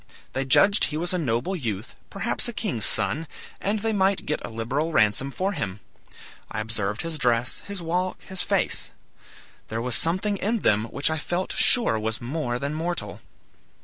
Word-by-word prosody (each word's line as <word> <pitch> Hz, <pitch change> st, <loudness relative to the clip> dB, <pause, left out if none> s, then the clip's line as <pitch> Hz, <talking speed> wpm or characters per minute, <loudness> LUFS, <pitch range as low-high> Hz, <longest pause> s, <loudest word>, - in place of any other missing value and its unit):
They 135 Hz, +1 st, -1 dB
judged 200 Hz, +10 st, +6 dB
he 150 Hz, -, -3 dB
was 175 Hz, +3 st, 0 dB
a 180 Hz, -, +1 dB
noble 135 Hz, +5 st, 0 dB
youth, 115 Hz, -, -4 dB
perhaps 200 Hz, +5 st, -1 dB
a 240 Hz, -, -4 dB
king's 195 Hz, -, -2 dB
son, 160 Hz, +2 st, +1 dB, 0.3 s
and 205 Hz, +1 st, -1 dB
they 225 Hz, 0 st, 0 dB
might 195 Hz, -1 st, +2 dB
get 150 Hz, -, -2 dB
a -, -, -5 dB
liberal 125 Hz, +8 st, -1 dB
ransom 110 Hz, +1 st, +3 dB
for 190 Hz, +8 st, -1 dB
him. 110 Hz, -, -3 dB, 0.7 s
I -, -, -3 dB
observed 110 Hz, -1 st, -1 dB
his 165 Hz, -2 st, -3 dB
dress, 120 Hz, 0 st, +2 dB
his 200 Hz, -3 st, -5 dB
walk, 180 Hz, +3 st, -1 dB
his 190 Hz, -1 st, -2 dB
face. -, -, 0 dB, 0.8 s
There 115 Hz, -, -3 dB
was 125 Hz, +1 st, -1 dB
something 185 Hz, -, +1 dB
in 215 Hz, +3 st, 0 dB
them 105 Hz, +1 st, +3 dB
which 140 Hz, +6 st, 0 dB
I 160 Hz, -, -1 dB
felt 175 Hz, +4 st, -2 dB
sure 235 Hz, -, +4 dB
was 110 Hz, +1 st, -2 dB
more 125 Hz, -1 st, -2 dB
than 140 Hz, +3 st, -3 dB
mortal. 160 Hz, -, -3 dB
150 Hz, 180 wpm, -25 LUFS, 115-185 Hz, 0.8 s, judged